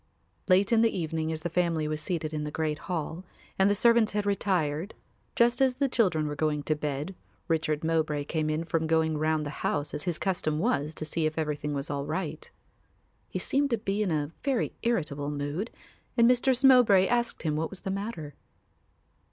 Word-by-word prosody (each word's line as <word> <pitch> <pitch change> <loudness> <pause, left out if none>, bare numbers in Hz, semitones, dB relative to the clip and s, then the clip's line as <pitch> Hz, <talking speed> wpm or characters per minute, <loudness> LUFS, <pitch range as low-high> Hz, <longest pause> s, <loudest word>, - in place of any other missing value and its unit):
Late 190 +3 +4
in 225 -1 +5
the 230 - +5
evening 160 -1 -2
as 160 -1 -4
the 175 - -2
family 170 -3 +1
was 155 0 -3
seated 160 -1 -3
in 150 -1 -2
the 150 - -3
great 155 0 -2
hall 165 0 -3 0.4
and 190 +1 +5
the 205 - +3
servants 235 0 +4
had 210 0 0
retired, 185 -4 0 0.4
just 240 +2 +3
as 260 -2 +3
the 275 +1 +1
children 185 - +2
were 145 0 -3
going 150 -1 0
to 155 - +1
bed, 150 +3 -3 0.3
Richard 160 -2 0
Mowbray 160 -2 0
came 155 +1 -1
in 155 +2 -1
from 160 -1 -1
going 160 -1 +2
round 155 0 +1
the 145 - -4
house 145 - -1
as - - -2
his 170 0 -2
custom 175 -5 -1
was 155 - 0
to 155 - -5
see 155 +1 0
if 155 - -5
everything 150 -2 -2
was 140 +2 -4
all 140 0 -3
right. 160 -4 -4 0.8
He - - -3
seemed 280 +1 +1
to 235 - +1
be 205 0 -2
in 205 - +1
a 150 -2 -1
very 270 -4 0
irritable 150 -11 -1
mood 145 +9 -3 0.5
and 235 0 +6
Mistress 250 +1 +3
Mowbray 245 -8 +7
asked 240 +2 0
him 155 -2 0
what 160 +1 -1
was 195 - -7
the 190 - -3
matter. 195 -7 -5
160 Hz, 200 wpm, -28 LUFS, 150-205 Hz, 0.8 s, Mowbray